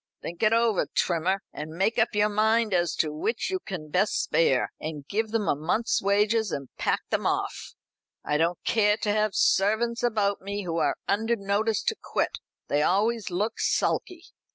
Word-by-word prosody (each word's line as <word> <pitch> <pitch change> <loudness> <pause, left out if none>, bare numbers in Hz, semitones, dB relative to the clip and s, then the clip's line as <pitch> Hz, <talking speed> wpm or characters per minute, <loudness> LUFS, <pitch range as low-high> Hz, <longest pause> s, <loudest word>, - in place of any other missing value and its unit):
Think 170 - -7
it 215 -1 +4
over, 230 -3 +2
Trimmer, 185 +3 +1
and 155 +1 -7
make 210 +6 +1
up 220 - +1
your 210 0 +3
mind 220 +1 +2
as 175 -1 +1
to 155 -2 0
which 225 - -2
you 375 - -1
can 180 - -7
best 195 +6 +1
spare, 135 -6 +2
and 150 -3 -6
give 220 +2 -1
them 220 -2 -1
a - - +2
month's 175 +11 0
wages, 210 +1 +2
and 140 -2 -4
pack - - 0
them - - 0
off. - - -3 0.5
I 150 - +1
don't 170 +1 +1
care 210 -2 +3
to 210 - -1
have 215 -1 0
servants 220 +4 +2
about 210 -4 0
me 200 +1 -4
who 170 -2 -3
are - - +1
under 225 +4 +1
notice 205 +1 0
to - - 0
quit. - - -2 0.3
They 145 - +1
always 210 +6 +1
look 210 +6 -2
sulky." 355 -3 0
205 Hz, 180 wpm, -26 LUFS, 175-220 Hz, 0.5 s, it